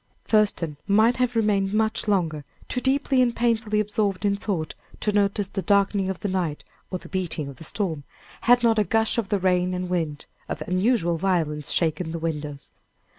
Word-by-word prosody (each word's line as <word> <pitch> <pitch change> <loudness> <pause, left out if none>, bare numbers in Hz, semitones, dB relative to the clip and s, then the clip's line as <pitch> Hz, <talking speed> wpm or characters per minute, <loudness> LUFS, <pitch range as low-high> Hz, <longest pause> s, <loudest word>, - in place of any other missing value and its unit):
Thurston 200 -8 +2
might 220 +4 +4
have 250 -1 0
remained 205 -3 +1
much 220 0 0
longer, 165 -7 0 0.2
too 250 - -2
deeply 270 0 +2
and 240 -2 +2
painfully 225 -3 +1
absorbed 205 -2 0
in 200 -1 +2
thought 185 -6 -3 0.3
to 210 - 0
notice 205 -1 +1
the 195 0 -3
darkening 200 +1 +2
of 190 - -4
the - - -1
night 180 -6 -2 0.3
or 185 - -2
the - - -13
beating 175 -5 -2
of 140 -2 -9
the - - -11
storm, 165 -4 -3 0.5
had 245 0 +6
not 225 -2 +4
a - - +4
gust 225 +2 +1
of 205 -4 -3
the 205 - +2
rain 180 -1 +1
and 180 0 -3
wind, 160 -5 -2 0.2
of 155 - -3
unusual 185 -2 +1
violence, 160 -5 0
shaken 160 0 0
the - - -2
windows. 150 -4 -4
195 Hz, 185 wpm, -24 LUFS, 165-215 Hz, 0.5 s, had